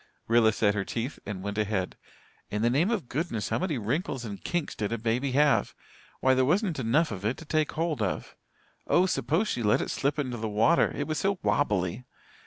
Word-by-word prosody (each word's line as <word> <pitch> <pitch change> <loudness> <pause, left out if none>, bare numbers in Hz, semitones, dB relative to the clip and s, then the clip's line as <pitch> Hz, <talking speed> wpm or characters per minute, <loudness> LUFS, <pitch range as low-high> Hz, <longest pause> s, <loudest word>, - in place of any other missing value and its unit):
Rilla 115 -1 +5
set 105 -1 +2
her 100 -1 -1
teeth 120 +7 -4
and 95 -2 -5
went 100 +1 -3
ahead. 105 -3 -1 0.5
In 105 +1 -2
the 120 - +3
name 155 - +2
of 210 - -1
goodness, 120 - -2
how - - 0
many 175 -6 -1
wrinkles 130 - -2
and 100 -3 -7
kinks 175 -3 -2
did 105 0 -3
a 115 - 0
baby 120 +4 -1
have? 145 +1 +3 0.5
Why, 130 - +4
there 130 0 +3
wasn't 175 - +1
enough 135 +6 +2
of 100 -2 -6
it 110 +5 0
to 165 - -10
take 155 0 0
hold 160 -5 -1
of. 95 -3 -2 0.5
Oh, 180 - +4
suppose 185 +2 0
she 125 - -2
let 105 -2 +3
it - - -2
slip 140 +3 0
into 130 -5 -2
the 110 -1 -3
water 115 +11 +3
it - - -2
was 155 -1 -2
so 195 0 +1
wobbly! 105 -4 0
125 Hz, 210 wpm, -28 LUFS, 110-155 Hz, 0.5 s, Rilla